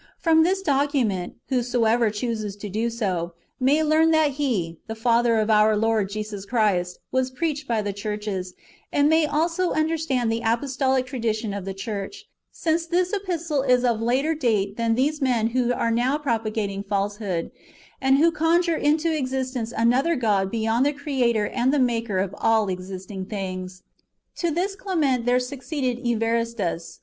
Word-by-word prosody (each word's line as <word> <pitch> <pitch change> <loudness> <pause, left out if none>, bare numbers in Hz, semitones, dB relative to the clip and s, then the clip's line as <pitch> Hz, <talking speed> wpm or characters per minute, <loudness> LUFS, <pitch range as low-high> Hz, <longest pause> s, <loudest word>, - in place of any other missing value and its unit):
From 320 -1 +4
this 380 +4 +1
document, 270 - 0
whosoever 240 -3 +2
chooses 215 -1 -3
to 205 0 -7
do 220 +4 -1
so, 185 -7 -2 0.3
may 280 +5 +3
learn 315 +1 +4
that 315 -2 +3
He, 225 - -2
the 225 - -5
Father 235 0 +2
of 215 0 +1
our 215 0 +4
Lord 220 -2 +1
Jesus 210 -1 -5
Christ, 200 -6 0
was 260 0 +1
preached 295 +1 -3
by 225 -3 0
the 205 -1 -3
churches, 205 -3 -4 0.4
and 285 0 +3
may 320 -1 +4
also 335 +4 0
under 315 +1 0
stand 255 -7 0
the 225 +1 -1
apostolical 260 +2 +1
tradition 225 -4 -2
of 200 -2 -5
the 195 -1 -5
church, 210 - -6 0.2
since 330 0 -1
this 360 +3 0
epistle 340 -7 -1
is 250 -2 +3
of 230 -2 +1
older 260 +7 +1
date 215 -9 0
than 230 0 +1
these 290 +5 0
men 240 -4 +2
who 245 0 +1
are 230 -1 0
now 245 +5 +1
propagating 220 -7 -2
falsehood, 200 -3 -2 0.5
and 265 +1 +4
who 330 +3 +4
conjure 335 +2 +2
into 315 +2 +1
existence 255 -4 -2
another 250 +9 +2
god 205 -7 +1
beyond 225 +3 +1
the 290 +1 +2
Creator 255 -7 0
and 255 +1 +1
the 295 - +2
IMaker 230 -7 +1
of 195 - -6
all 220 -3 +2
existing 185 +1 -6
things. 185 -2 -5 0.5
To 345 - 0
this 365 +5 -1
Clement 295 - 0
there 250 +1 +4
succeeded 255 0 -3
Evaristus. 230 -7 -1
240 Hz, 160 wpm, -24 LUFS, 210-290 Hz, 0.5 s, From